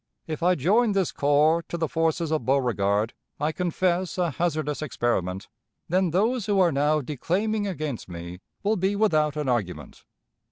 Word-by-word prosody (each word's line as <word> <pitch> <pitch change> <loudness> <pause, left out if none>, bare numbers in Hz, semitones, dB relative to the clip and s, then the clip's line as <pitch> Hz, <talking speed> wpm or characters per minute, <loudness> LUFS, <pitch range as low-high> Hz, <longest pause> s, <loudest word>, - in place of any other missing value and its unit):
If 155 -1 -5
I 180 +2 +4
join 210 - +3
this 195 -3 +1
corps 150 +3 +3
to 170 - -3
the 160 -1 0
forces 165 +1 0
of 155 -5 0
Beauregard 115 -5 +1 0.3
(I 150 +2 0
confess 180 +1 -1
a 175 -3 +1
hazardous 155 -2 -1
experiment), 110 - -1 0.4
then 185 +1 +2
those 220 +6 +1
who 205 -2 +2
are 175 -3 +4
now 150 +2 +2
declaiming 200 - -1
against 155 - -4
me 85 +1 -7 0.2
will 210 +2 +1
be 190 +2 0
without 155 -8 +2
an 150 -2 -2
argument. 110 -8 -3
155 Hz, 160 wpm, -25 LUFS, 135-185 Hz, 0.4 s, I